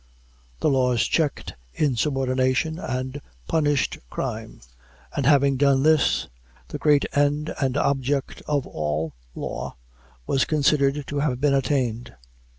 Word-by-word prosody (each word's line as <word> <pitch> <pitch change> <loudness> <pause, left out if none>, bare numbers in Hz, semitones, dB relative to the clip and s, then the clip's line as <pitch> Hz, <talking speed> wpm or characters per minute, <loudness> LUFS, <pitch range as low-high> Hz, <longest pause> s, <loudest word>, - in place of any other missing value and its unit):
The - - +3
laws 125 -3 +2
checked 155 -4 -1 0.2
insubordination 135 +2 +1
and 130 +2 -4 0.3
punished 145 -3 +1
crime; - - -5 0.5
and 140 -2 0
having 140 -2 +4
done 135 -1 +3
this, 155 -2 +3 0.4
the - - -5
great 150 -2 +4
end 145 +2 +1
and 135 0 +1
object 140 -1 0
of 145 -3 0
all 75 +1 -3 0.2
law - - -5 0.5
was 135 - +2
considered 145 -1 +2
to 145 +1 -3
have 140 -4 0
been 145 0 +2
attained. 125 -4 -1
140 Hz, 120 wpm, -24 LUFS, 130-145 Hz, 0.5 s, having